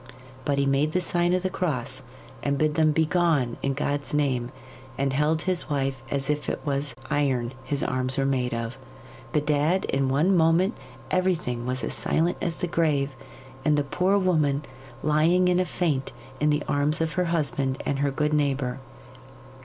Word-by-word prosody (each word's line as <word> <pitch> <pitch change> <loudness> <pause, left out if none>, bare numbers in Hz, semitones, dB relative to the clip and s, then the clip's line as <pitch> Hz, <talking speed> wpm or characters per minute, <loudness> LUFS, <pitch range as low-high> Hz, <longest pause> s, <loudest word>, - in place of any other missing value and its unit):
But 140 -1 +1
he 140 - +2
made 140 +3 +1
the 180 - +3
sign 175 0 +1
of 185 0 +1
the 185 - +1
cross 135 -8 -2 0.4
and 140 +2 0
bid 155 0 +2
them 155 0 +3
begone 160 -5 +2
in 135 0 0
God's 145 +1 -1
name, 130 -5 +1 0.5
and 135 0 0
held 150 +3 +1
his 185 -4 -1
wife 135 -3 -1
as 140 -1 -1
if 150 0 -1
it - - -2
was 140 -2 -1 0.2
iron 130 -4 +1
his 140 +1 -1
arms 130 0 -1
were 135 - +2
made 130 -2 0
of. 115 +2 -4 0.5
Bedad, 150 +5 +1
in 135 -1 0
one 155 +9 +3
moment 165 +3 +3 0.4
everything 165 -10 0
was 130 0 -2
as - - -2
silent 170 +2 +1
as 170 -1 -1
the 180 - -3
grave, 150 -5 +1 0.5
and 150 -1 +3
the 145 - +2
poor 180 +8 +1
woman 155 -7 +2 0.4
lying 160 +5 +3
in 180 0 +3
a 185 - +2
faint 150 -9 -1 0.3
in 150 - +2
the 150 0 +1
arms 145 +3 +1
of 160 -1 -1
her 180 -1 +1
husband 145 -5 0
and 140 - -1
her 140 0 +2
good 150 +3 0
neighbour. 135 -4 0
145 Hz, 175 wpm, -26 LUFS, 135-165 Hz, 0.5 s, the